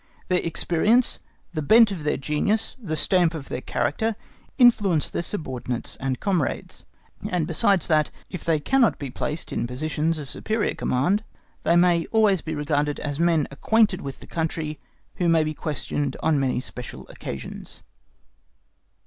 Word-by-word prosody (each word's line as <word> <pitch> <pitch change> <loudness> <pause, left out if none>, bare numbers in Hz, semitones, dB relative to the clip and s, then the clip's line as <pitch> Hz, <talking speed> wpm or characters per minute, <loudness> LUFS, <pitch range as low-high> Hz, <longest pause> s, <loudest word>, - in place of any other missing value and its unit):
(*) - - -31
Their 180 -1 +3
experience, 175 +8 +2 0.3
the 155 - -2
bent 220 +7 +6
of 175 -6 -5
their 150 - 0
genius, 150 +11 0
the 160 -8 -3
stamp 170 +1 +3
of 145 -4 -7
their 125 - -3
character, 220 +14 -1 0.4
influence 205 - +4
their - - -1
subordinates 130 - -4
and 130 -1 -2
comrades; 180 -8 -2 0.4
and 175 -3 0
besides 175 +2 +2
that, 155 -2 +3 0.2
if 180 - -7
they 160 -2 +2
cannot 250 - +3
be 140 -3 -6
placed 150 +5 -4
in - - -1
positions 155 +5 -1
of 150 -2 -6
superior 220 +9 -1
command, 180 +12 +1 0.4
they 170 - +3
may 175 -1 +4
always 210 -5 +3
be 160 -1 -4
regarded 145 0 0
as 145 0 -4
men 165 -3 +3
acquainted 210 +6 +2
with 135 -1 -7
the - - -10
country, 160 -2 -3 0.4
who 175 -3 +2
may 165 -1 +4
be 155 0 -2
questioned 145 -2 -3
on 155 -3 +3
many 130 -2 +1
special 125 -1 -7
occasions. 70 - -8
160 Hz, 155 wpm, -24 LUFS, 145-185 Hz, 0.4 s, bent